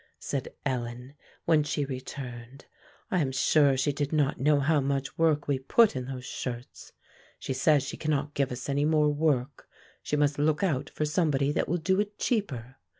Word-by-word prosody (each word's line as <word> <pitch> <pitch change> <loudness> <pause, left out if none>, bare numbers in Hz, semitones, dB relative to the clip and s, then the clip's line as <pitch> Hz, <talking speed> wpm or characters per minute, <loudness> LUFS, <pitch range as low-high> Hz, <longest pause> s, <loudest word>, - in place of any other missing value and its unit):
said 140 -3 -4 0.2
Ellen, 125 0 -3 0.3
when 160 -2 +4
she 145 -1 -1
returned. 130 -1 -8 0.5
"I 185 - +2
am 135 -5 0
sure 140 +1 +3
she 135 +3 +1
did 145 0 -2
not 150 -4 +1
know 145 +2 +3
how 150 +2 +2
much 135 0 -2
work 155 -3 +2
we 140 -2 +1
put 215 - +4
in 130 -1 -3
those 130 -1 -6
shirts. 120 -2 -6 0.5
She - - -4
says 145 +1 +3
she 140 - -6
cannot 150 -1 -1
give 140 -3 0
us 125 0 -5
any 140 +1 +1
more 150 0 +3
work; 145 -3 0 0.3
she - - -2
must 145 -1 +1
look 150 +3 +2
out 150 -6 0
for 155 - -2
somebody 150 -3 +1
that - - -1
will 175 - +1
do 190 +4 +1
it 205 0 -2
cheaper. 130 - -2
145 Hz, 185 wpm, -28 LUFS, 130-155 Hz, 0.5 s, when